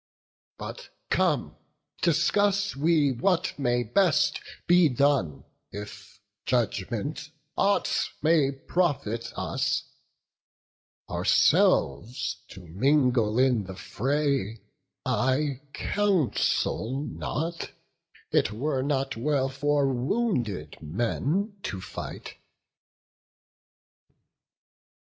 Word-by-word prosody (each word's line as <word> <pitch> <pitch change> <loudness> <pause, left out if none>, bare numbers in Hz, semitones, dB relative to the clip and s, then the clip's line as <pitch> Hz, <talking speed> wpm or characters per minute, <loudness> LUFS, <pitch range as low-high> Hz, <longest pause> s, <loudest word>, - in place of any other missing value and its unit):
But - - -8 0.2
come, 150 - +1 0.4
discuss 200 +5 +2
we 150 -1 +3
what 165 +9 +1
may 120 -2 +1
best 155 - +2 0.2
be 175 -2 +5
done, 130 - +1 0.3
If 105 -1 -9 0.3
judgment 120 +5 -1 0.3
aught 200 +1 +1
may 155 -4 +4
profit 135 - -1
us; - - -1 1.2
ourselves 100 - +2
To 95 - -12
mingle 120 - +2
in 125 -5 +3
the 95 0 -8
fray 135 -3 -1 0.4
I 130 +1 0
counsel 150 - 0
not; 165 +3 -4 0.6
It - - +2
were 130 +5 -1
not 135 -1 -1
well 135 +2 0
for 140 0 +1
wounded 125 - -1
men 145 - -1
to 95 - -4
fight." 90 - -8
135 Hz, 80 wpm, -27 LUFS, 115-155 Hz, 1.2 s, be